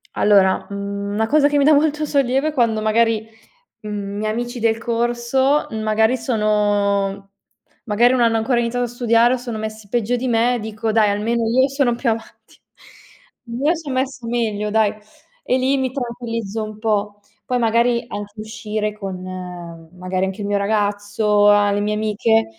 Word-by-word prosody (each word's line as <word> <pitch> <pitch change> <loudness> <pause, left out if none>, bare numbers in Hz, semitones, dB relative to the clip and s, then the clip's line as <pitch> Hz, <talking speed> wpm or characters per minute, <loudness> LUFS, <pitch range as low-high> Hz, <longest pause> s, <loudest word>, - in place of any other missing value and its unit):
Allora, 195 -2 +3
mhmm, 200 0 -4
una 220 - +1
cosa 290 +3 +4
che 290 - 0
mi 280 - +3
dà 305 - +6
molto 300 +1 +2
sollievo 275 0 +1
è - - -3
quando, 230 -6 +1
magari, 220 0 +2 0.5
mhmm, 205 -1 -5
miei 215 0 -1
amici 240 +2 -4
del 225 0 +2
corso, 240 +5 0
magari 220 +2 +1
sono 205 -3 0 0.5
magari 235 +3 +3
non 255 - +1
hanno 230 -1 +3
ancora 240 +2 +1
iniziato 245 +1 -1
a - - -3
studiare 235 0 +3
o 255 - +2
sono 240 -2 -6
messi 215 -1 -6
peggio 240 +2 0
di 255 +1 -3
me, 240 +1 +2
dico: 220 0 -3
"Dai, 215 -1 +4
almeno 225 +3 0
io 260 +3 +4
sono 270 -3 +1
più 235 0 0
avanti." 225 0 -7 0.8
"Io 260 +8 0
son 305 -5 -5
messa 260 -2 -2
meglio, 220 -3 -1
dai!" 215 -1 +2 0.5
e 255 - +1
lì 265 +1 +1
mi 260 -1 -1
tranquillizzo 230 -4 -4
un 215 0 -7
po'. 210 -2 -1 0.3
Poi, 250 - 0
magari, 235 +1 +2
anche 205 -2 -7
uscire 215 -1 -4
con, 195 -3 -7 0.7
magari, 185 +1 -2
anche 195 +2 -5
il - - -3
mio 205 0 +1
ragazzo, 205 0 +1
a 205 0 +5
le 205 - 0
mie 210 +1 0
amiche 215 +1 +1
225 Hz, 170 wpm, -20 LUFS, 210-245 Hz, 0.8 s, dà